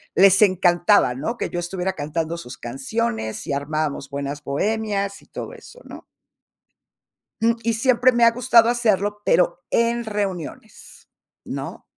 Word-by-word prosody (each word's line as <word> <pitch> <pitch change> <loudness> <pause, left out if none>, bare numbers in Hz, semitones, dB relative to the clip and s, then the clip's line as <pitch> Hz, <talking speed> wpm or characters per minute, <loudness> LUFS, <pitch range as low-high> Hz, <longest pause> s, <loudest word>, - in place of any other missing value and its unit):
les 195 +1 +6
encantaba, 180 -6 +4
¿no?, 190 - -3
que - - -3
yo 175 - -3
estuviera 180 +2 -3
cantando 160 +1 -3
sus 125 -7 -9
canciones, 135 - -3
y - - -1
armábamos 145 0 -2
buenas 140 +1 -5
bohemias 200 +6 -2
y - - -22
todo - - -7
eso, - - -14
¿no? - - -11 1.4
Mm, 230 +1 +3
y 230 +1 +1
siempre 250 +2 +3
me 240 -1 +2
ha 230 - +7
gustado 235 -1 +4
hacerlo, 210 -4 0
pero 175 0 +2
en 235 0 +1
reuniones, 205 -1 -6 0.4
¿no? - - -7
195 Hz, 140 wpm, -22 LUFS, 155-230 Hz, 1.4 s, ha